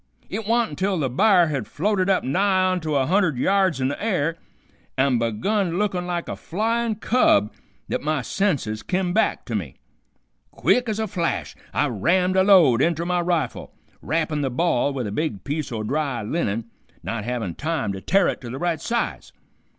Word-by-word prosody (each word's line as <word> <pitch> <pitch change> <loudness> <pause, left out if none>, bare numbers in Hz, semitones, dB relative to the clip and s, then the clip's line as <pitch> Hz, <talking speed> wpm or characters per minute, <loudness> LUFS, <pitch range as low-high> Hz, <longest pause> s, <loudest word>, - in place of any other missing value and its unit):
It 215 +1 -4
wa'n't 235 -2 +2
until 190 +5 -1
the 135 -6 -1
b'ar 175 - +4
had 135 -8 -3
floated 195 +2 0
up 190 - +2
nigh 185 +7 +2
onto 160 -5 -1
a 135 -1 +2
hundred 180 -3 +2
yards 190 +1 +2
in 130 - +1
the 145 - -5
air, 165 -7 0 0.6
an' 130 -2 +3
begun 175 - 0
to 170 - -3
look 210 0 0
like 180 -1 -3
a - - -4
flyin' 225 +4 -1
cub, 200 - +2 0.3
that - - -2
my 155 -3 -1
senses 140 - -1
kim 180 -1 -1
back 220 - +1
to - - -6
me. - - -3 0.7
Quick 245 -2 +1
ez 215 - -1
a 220 - 0
flash 180 -5 -2 0.2
I - - +1
rammed 180 - +1
a 190 - +5
load 170 - +6
inter 170 +2 +1
my 180 0 +1
rifle, 170 -2 -2 0.3
wrappin' 155 -2 -1
the 135 - 0
ball 140 0 +1
with 130 -3 -3
a 105 - -4
big 110 -4 -2
piece 145 -1 -3
o' 110 -2 -3
dry 135 -1 -2
linen, 115 -4 -2 0.4
not 115 -2 -3
havin' 115 -6 -3
time 150 - -2
to 95 - -7
tear 195 - +3
it - - -2
to 120 - -7
the 130 - -5
right 170 +1 -1
size. 235 0 -2
165 Hz, 190 wpm, -23 LUFS, 130-190 Hz, 0.7 s, load